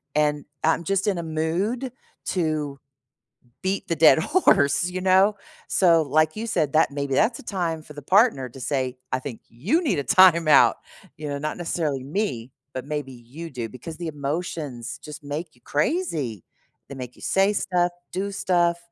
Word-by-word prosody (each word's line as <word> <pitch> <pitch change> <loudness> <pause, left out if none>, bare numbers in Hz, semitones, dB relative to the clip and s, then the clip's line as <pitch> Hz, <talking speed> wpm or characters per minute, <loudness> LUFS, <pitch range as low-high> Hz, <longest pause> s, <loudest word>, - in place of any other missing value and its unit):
and 150 -1 +1 0.2
I'm 160 +1 +2
just 195 +3 0
in 195 - +1
a 170 - -3
mood 180 +11 -1 0.3
to 155 -5 -1 0.8
beat 190 +1 -2
the 165 - 0
dead 160 +1 +7
horse, 175 - +3
you 185 +1 -4
know, 190 +3 +4 0.3
so, 170 -4 +4
like 155 +3 +2
you 225 +2 -3
said, 155 -10 0
that 155 - +4
maybe 140 -1 -2
that's 225 - +2
a - - -12
time 170 -7 -2
for 150 - -13
the 145 - -9
partner 185 - +3
to 130 +2 -13
say, 130 -2 -1 0.2
"I 130 - +2
think 130 -4 -7
you 190 - 0
need 245 - 0
a 140 - -1
timeout," 170 0 +6 0.4
you 150 -1 -6
know, 140 0 -3
not 155 +1 -3
necessarily 155 -6 -2
me, 135 - -3 0.2
but 130 +1 -5
maybe 145 -3 -4
you 130 +8 -10
do 120 -4 -5
because 130 +7 -9
the 170 +1 -6
emotions 145 -4 -4
just 150 0 -10
make 155 +3 -5
you 120 - -26
crazy, 150 - -1 0.4
they 140 - -8
make 125 -2 -8
you - - -17
say 195 +2 +2
stuff, 180 -3 +1 0.2
do 195 +2 -2
stuff, 175 -3 +1
155 Hz, 180 wpm, -24 LUFS, 140-185 Hz, 0.8 s, dead